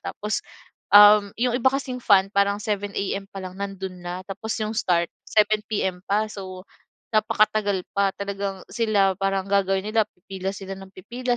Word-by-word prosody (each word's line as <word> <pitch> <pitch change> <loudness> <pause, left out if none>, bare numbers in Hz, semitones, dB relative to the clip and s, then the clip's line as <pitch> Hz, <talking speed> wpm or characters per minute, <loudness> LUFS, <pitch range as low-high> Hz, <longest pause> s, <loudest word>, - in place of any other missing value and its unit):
Tapos 210 +1 -3 0.5
um, 205 0 +9
'yong 245 +1 0
iba 260 - +5
kasing 260 -2 -3
fan 195 -3 +4
parang 200 0 +2
7:00 205 -1 -2
AM 195 0 -2
pa 195 - -8
lang 185 0 -7
nando'n 190 -2 -5
na, 175 0 -5
tapos 205 +3 -5
'yong 215 0 -2
start 175 -5 +1 0.2
7:00 215 0 +3
PM 190 -4 -1
pa. 210 +2 +2
So, 185 -2 -8 0.5
napakatagal 215 -3 +2
pa, 200 0 +3
talagang 200 -1 -4
sila 210 -4 +2
parang 195 -1 0
gagawin 195 -1 +1
nila 220 0 +2
pipila 190 +1 -6
sila 195 -1 -8
nang 195 0 -11
pipila 240 +6 -3
200 Hz, 165 wpm, -24 LUFS, 195-215 Hz, 0.5 s, um